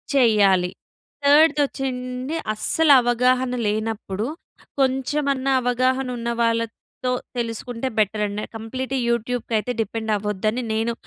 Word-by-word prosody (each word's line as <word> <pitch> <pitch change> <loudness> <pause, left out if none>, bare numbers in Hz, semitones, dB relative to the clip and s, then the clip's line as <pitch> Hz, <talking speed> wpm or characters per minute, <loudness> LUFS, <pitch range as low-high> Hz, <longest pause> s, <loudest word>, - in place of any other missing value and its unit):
చెయ్యాలి. 200 -8 +4 0.6
3 300 +1 +6
వచ్చండి 255 +1 -4 0.2
అస్సలు 285 +8 +3
అవగాహన 250 +1 +2
లేనప్పుడు, 215 -1 -2 0.5
కొంచెమన్నా 270 +1 +1
అవగాహన 255 +2 +1
ఉన్నవాళ్ళతో 230 +1 -2 0.3
తెలుసుకుంటే 235 +2 -3
బెటరండి. 210 0 0
కంప్లీట్ 255 +4 -4
యూట్యూబ్‌కి 235 0 -2
అయితే 245 - -3
డిపెండ్ 220 0 -2
అవ్వద్దని 210 +4 -1
నేను 225 +2 0
240 Hz, 90 wpm, -22 LUFS, 220-260 Hz, 0.6 s, 3